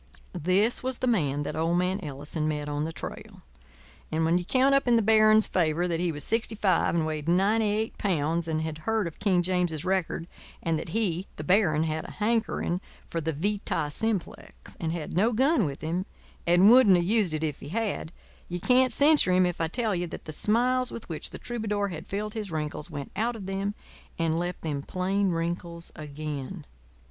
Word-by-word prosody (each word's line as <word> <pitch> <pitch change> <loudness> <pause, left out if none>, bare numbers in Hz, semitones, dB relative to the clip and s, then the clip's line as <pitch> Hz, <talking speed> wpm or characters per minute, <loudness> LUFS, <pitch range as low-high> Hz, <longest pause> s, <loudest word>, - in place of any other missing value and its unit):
This 185 +7 +2
was 260 -1 -2
the - - -2
man 145 - +1
that - - -4
old 165 +2 +1
man 180 +2 0
Ellison 150 +1 -4
met 150 -1 -2
on 145 +1 -2
the 165 - -3
trail; - - -9 0.7
and 160 +1 +1
when 170 +2 +3
you 175 - -6
count 265 +6 +3
up 275 -2 +3
in 240 - +5
the 225 - +3
baron's 215 0 +6
favour 170 0 +1
that 170 -2 -1
he 175 -1 0
was 145 -2 -2
sixty 225 +3 +1
five 195 -4 +2
and 165 -2 +1
weighed 155 0 -3
ninety 205 +5 +3
eight 215 +2 -1
pounds 165 -3 0
and 160 -1 -1
had 160 -1 -4
heard 220 -2 +1
of 170 - -7
King 185 -4 +2
James's 175 -4 0
record 185 -3 -1 0.4
and 165 -2 0
that 160 - -6
he 190 -2 -1
(the 155 - -6
baron) 160 -3 +3
had 155 0 -2
a - - -8
hankering 215 -5 0 0.3
for 165 - -1
the 160 +1 -1
vita 165 -2 -1
simplex 215 +1 -4
and 160 -1 -2
had 165 -2 -5
no 220 +7 +3
gun 265 - +3
with 140 -2 -5
him 175 +4 -2 0.4
and 180 +5 +6
wouldn't 240 -6 +7
have 175 -1 +2
used 200 -5 +2
it 155 - -3
if 150 -3 -2
he 140 - -9
had, 210 -4 -2 0.4
you 175 0 -3
can't 255 +4 +3
censure 290 -9 +5
him 180 0 +4
if 175 -1 -2
I 165 - +2
tell 220 +4 -1
you 175 -1 -1
that - - -9
the 155 - -6
smiles 250 +8 +1
with 230 - -8
which 160 - -4
the - - -8
troubadour 210 -4 -2
had 160 -3 -7
filled 210 +2 -3
his 215 -3 -4
wrinkles 155 0 -4
went 145 -3 -6
out 235 +2 0
of 205 -4 -7
them 195 +2 -2 0.4
and 165 0 +1
left 175 +1 -3
them 145 -3 -3
plain 190 +5 0
wrinkles 170 0 -3
again. 150 +1 -6
180 Hz, 205 wpm, -27 LUFS, 160-215 Hz, 0.7 s, wouldn't